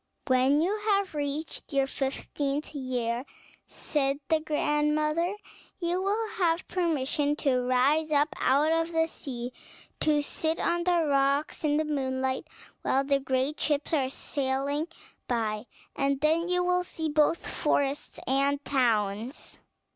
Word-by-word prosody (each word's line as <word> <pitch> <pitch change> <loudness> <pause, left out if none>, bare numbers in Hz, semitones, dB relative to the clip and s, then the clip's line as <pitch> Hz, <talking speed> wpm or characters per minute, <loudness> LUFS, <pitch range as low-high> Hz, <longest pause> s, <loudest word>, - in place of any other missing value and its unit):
"When 260 +3 +4
you 375 +5 +1
have 395 -3 +2
reached 295 +2 -4
your 275 -1 +3
fifteenth 275 +2 -3
year," 250 -3 -2 0.4
said 275 -2 -1
the 320 - +4
grand 300 -1 +1
mother, 315 +5 0 0.4
"you 350 +1 -1
will 420 +3 0
have 340 -2 +1
permission 295 -4 0
to 270 -4 +1
rise 285 +5 +3
up 295 +1 +3
out 290 +4 +3
of 330 +1 +1
the 325 0 +3
sea, 255 -6 -6 0.5
to 300 -1 +2
sit 320 +2 -1
on 345 0 0
the 350 -2 +3
rocks 280 +2 +1
in 295 -1 +2
the 310 - +1
moonlight, 265 -1 -1 0.3
while 270 - +2
the 275 0 +2
great 265 +2 -1
ships 295 +1 0
are 270 -4 +2
sailing 280 +3 -2 0.4
by; 220 -2 -1 0.3
and 275 0 +1
then 320 +3 +2
you 360 0 +2
will 360 0 +2
see 320 -2 -3
both 305 +2 +2
forests 285 -1 -1
and 275 +2 +1
towns." 230 -2 0
290 Hz, 140 wpm, -28 LUFS, 270-320 Hz, 0.5 s, When